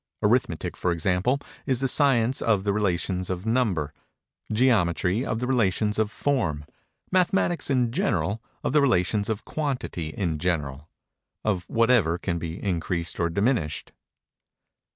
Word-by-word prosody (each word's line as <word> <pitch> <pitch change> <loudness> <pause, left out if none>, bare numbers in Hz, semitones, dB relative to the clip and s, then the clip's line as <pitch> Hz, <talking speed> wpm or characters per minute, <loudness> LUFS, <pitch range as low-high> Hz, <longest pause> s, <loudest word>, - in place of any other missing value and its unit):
Arithmetic, - - +1
for 90 - 0
example, 90 - +1 0.3
is 130 -3 +2
the 135 - +1
science 130 -3 +3
of 105 -4 +2
the 100 -1 +1
relations 95 -2 -1
of 90 +1 -3
number—Geometry, 105 - 0
of 110 - -2
the 125 - -2
relations 110 -4 +1
of 110 -1 +2
form—Mathematics 140 - -1
in 125 -4 +2
general, 120 - 0 0.2
of - - -1
the 150 - +5
relations 105 -4 +2
of 110 -1 -3
quantity 135 - -3
in 80 -3 -2
general—of 85 +4 -4
whatever 115 -7 +3
can 85 -1 -2
be 85 +2 -5
increased 85 -3 -2
or 85 -1 +1
diminished. 100 - 0
105 Hz, 125 wpm, -25 LUFS, 85-125 Hz, 0.3 s, the